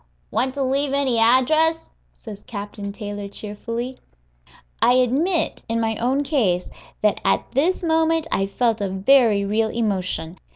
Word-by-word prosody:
"Want 255 +4 -1
to 280 - -1
leave 275 +1 0
any 270 -4 +1
address?" 310 +8 +3 0.2
says 210 -4 -11
Captain 205 -1 -7
Taylor, 205 -1 -6
cheerfully. 230 +5 -6 0.8
I 245 - +5
admit, 275 +8 +1
in 230 0 0
my 225 -1 0
own 265 +4 0
case, 215 - 0 0.3
that 210 - +2
at - - +1
this 325 +9 +1
moment 325 -1 +2
I 195 - +1
felt 225 +1 0
a 200 - -1
very 205 +1 +3
real 220 +2 +1
emotion. 185 -6 -2
235 Hz, 140 wpm, -22 LUFS, 205-275 Hz, 0.8 s, I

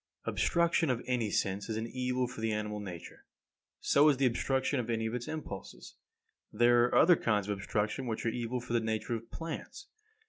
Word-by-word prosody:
41. - - -3
Obstruction 170 -2 +2
of 125 -2 0
any 120 -4 0
sense 100 +1 -1
is 110 - -2
an 110 - -2
evil 125 +1 -1
for 120 -2 -8
the 110 0 0
animal 105 0 -2
nature; 90 -5 -9 0.6
so 145 +2 +5
is 140 - +3
the 135 - +2
obstruction 130 +2 +1
of 120 - -3
any 110 -1 0
of 110 - -2
its 120 -1 -4
impulses. 150 -11 -7 0.6
There 120 +2 +5
are 125 - -1
other 175 +1 +7
kinds 105 -8 0
of 105 - -1
obstruction 105 +6 -2
which 110 0 -3
are - - +3
evil 120 +1 -2
for 120 0 -6
the 120 - +4
nature 110 +1 -2
of 115 0 -5
plants. 165 - -7
120 Hz, 205 wpm, -31 LUFS, 110-130 Hz, 0.6 s, other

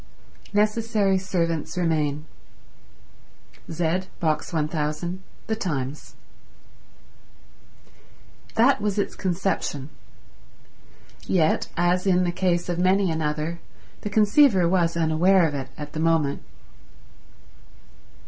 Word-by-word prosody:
Necessary 210 -2 +1
servants 170 -3 -2
remain. 155 -4 0 1.5
Z, 170 +3 -1
Box 155 -1 -1
1000, 155 +3 -2 0.2
The 220 - -1
Times. 145 - -4 2.4
That 260 +4 +4
was 205 -1 -1
its 200 - -1
conception; 180 -6 -2 1.4
yet, 160 -4 +2
as 175 +2 +1
in 180 -1 +3
the 175 - 0
case 175 -1 0
of 175 -1 -2
many 185 0 +3
another, 155 +1 -2 0.4
the 210 - -4
conceiver 210 - +4
was 170 -2 +1
unaware 170 +3 +3
of 150 - -5
it 135 -2 -4
at 150 -1 -8
the 155 - -4
moment. 160 -3 +1
175 Hz, 95 wpm, -24 LUFS, 155-190 Hz, 2.4 s, That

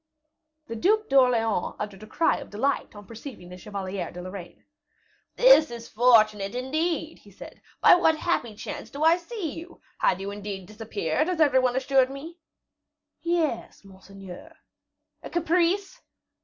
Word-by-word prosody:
The 230 - -6
Duc 425 - +1
d'Orleans 240 -7 +2
uttered 205 -2 -6
a 215 - -10
cry 325 +9 +1
of - - -9
delight 235 +2 -2
on 205 0 -11
perceiving 230 -5 -10
the 180 - -10
Chevalier 195 -2 -5
de 180 - -10
Lorraine. 185 -2 -9 0.7
"This - - +6
is 235 -1 -8
fortunate, 215 -3 +3
indeed," 315 +5 -2
he 205 - -18
said; 200 - -13 0.2
"by - - +8
what 325 -3 +4
happy 245 -10 -1
chance - - -7
do 285 +2 -5
I 325 +2 +5
see 360 -2 -5
you? 345 +2 -13 0.2
Had 185 - +2
you 195 +1 -5
indeed 200 -2 -6
disappeared, 215 - -2
as 360 -3 -2
every 285 -4 +5
one 250 -1 +1
assured 265 0 +2
me?" 315 +6 -9 0.8
"Yes, 325 -11 -2
monseigneur." 195 - -12 0.7
"A - - -8
caprice?" 355 +6 0
250 Hz, 150 wpm, -26 LUFS, 205-325 Hz, 0.8 s, by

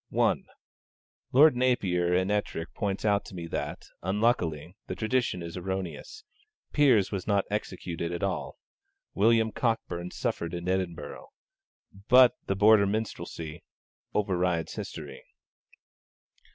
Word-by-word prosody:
(1) - - +1 0.8
Lord 145 +1 +7
Napier 95 -9 +1
and 95 +2 +2
Ettrick 95 -5 -2
points 100 0 -2
out 100 -1 +3
to 95 - -10
me 85 -2 -5
that, 75 -3 -4 0.2
unluckily, 90 -5 0
the - - -4
tradition 110 -6 0
is 85 0 -7
erroneous. 95 - -5 0.5
Piers 130 -10 +4
was 95 -3 -4
not 100 -2 +2
executed 90 -4 -3
at 85 - -4
all. 95 -3 -2 0.6
William 110 +2 +3
Cockburn 100 -7 -2
suffered 110 -8 -3
in 85 +1 -5
Edinburgh. 90 -2 -3 0.8
But 125 -1 +8
the 95 - 0
Border 105 0 +6
Minstrelsy 85 -6 -4 0.5
overrides 90 -5 0
history. - - -7
95 Hz, 115 wpm, -28 LUFS, 85-110 Hz, 0.8 s, But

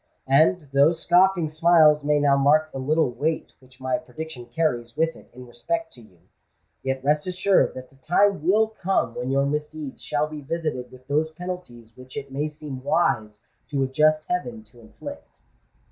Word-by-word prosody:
And, 155 +4 +3
though 140 +3 +5
scoffing 175 +1 +3
smiles 155 -1 +4
may 150 0 +2
now 145 -1 +4
mark 150 +3 +3
the 135 - -6
little 150 +1 +1
weight 155 +6 -2
which 130 0 -22
my 130 +4 -1
prediction 155 -5 -8
carries 120 -4 -2
with 160 +1 +1
it - - -17
in 125 +1 -12
respect 220 - -4
to 120 - -14
you, 100 -5 -20 0.6
yet 135 0 -3
rest 150 +4 +1
assured 185 +2 +2
that 130 0 -9
the 135 - -23
time 180 +5 +2
will 210 +6 +3
come 195 - -1
when 125 +2 -4
your 140 +1 +2
misdeeds 150 0 -4
shall 150 0 -1
be 155 -1 -8
visited 150 -4 -4
with 130 0 -15
those 150 +2 +1
penalties 160 -10 -8
which 130 +1 -12
it 140 -1 -6
may 145 +3 -1
seem 150 -3 -8
wise 110 -9 0 0.3
to 140 -2 0
a - - 0
just 155 +3 +2
heaven 220 +6 -3
to 120 - -20
inflict." 285 - -11
150 Hz, 180 wpm, -24 LUFS, 130-165 Hz, 0.6 s, though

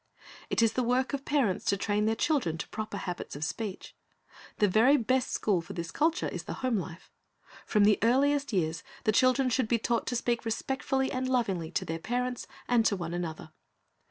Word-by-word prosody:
It - - +2
is 225 -1 +3
the 255 - 0
work 250 +3 +1
of 275 0 -3
parents 245 -10 +1
to 200 - +2
train 210 +1 0
their 225 - +2
children 230 - 0
to - - -5
proper 215 -1 -5
habits 180 -6 -5
of 145 - -5
speech. 200 +4 -5 0.6
The 210 - +4
very 230 +9 +5
best 255 +1 +1
school 195 -5 +1
for 165 - -9
this 170 -2 -5
culture 325 +3 +1
is - - -5
the - - -4
home 245 -4 +2
life. 180 -2 -7 0.6
From 210 -2 +3
the 210 0 +5
earliest 280 +5 +2
years 165 -5 0 0.2
the 220 - +3
children 255 +3 +3
should 240 0 +1
be 235 - +2
taught 230 +1 -1
to 245 - -1
speak 235 0 0
respectfully 265 +3 -1
and 255 0 -2
lovingly 195 -10 0
to - - -1
their 165 0 -3
parents 250 +5 -2 0.2
and 240 -2 +4
to 200 - +1
one 170 -3 -5
another. 165 -3 -5
225 Hz, 200 wpm, -29 LUFS, 190-255 Hz, 0.6 s, very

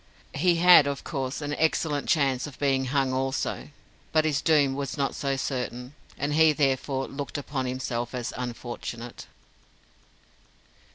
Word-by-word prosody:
He 175 +4 +3
had, 175 -3 +7
of 140 -1 -3
course, 135 -1 -3
an 145 0 -3
excellent 155 -2 0
chance 135 -4 +2
of 140 - -11
being 135 -2 +1
hung 135 0 0
also, 135 +2 -2 0.4
but 155 -1 +3
his 150 -3 +1
doom 145 -4 +3
was 140 +1 -4
not 140 -1 0
so 140 -1 -1
certain, 125 -1 -4 0.2
and 145 +1 -1
he 160 0 +5
therefore 135 -2 0
looked 140 0 -5
upon 140 -2 -3
himself 125 -1 -3
as 125 -1 -4
unfortunate. 120 -1 -6
135 Hz, 145 wpm, -26 LUFS, 130-145 Hz, 0.4 s, had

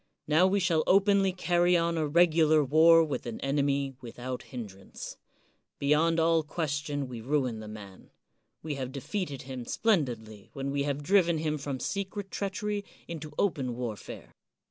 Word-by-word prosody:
Now 160 +5 +4
we 200 +1 +2
shall 170 -4 +2
openly 195 0 +4
carry 175 -1 +2
on 170 0 0
a 155 -2 0
regular 155 -1 +4
war 165 +4 +6
with 145 -5 -4
an 115 - -5
enemy 140 0 0
without 125 +1 -6
hindrance. 100 -7 -9 0.6
Beyond 155 +4 +2
all 165 0 +3
ques 155 0 -3
tion 145 -2 -4
we 120 -3 -7
ruin 130 -3 0
the 110 - -8
man; 100 -3 -11 0.5
we 155 -1 -3
have 130 -2 -4
defeated 145 - -4
him 130 -2 -6
splendidly 120 - -1
when 135 0 -3
we 140 0 0
have 140 +1 -3
driven 175 -1 +3
him 155 -1 -1
from 140 -2 -4
secret 195 +2 -4
treachery 205 +1 -2 0.2
into 155 -2 -7
open 135 -11 0
warfare. 115 -4 -7
150 Hz, 155 wpm, -29 LUFS, 130-170 Hz, 0.6 s, war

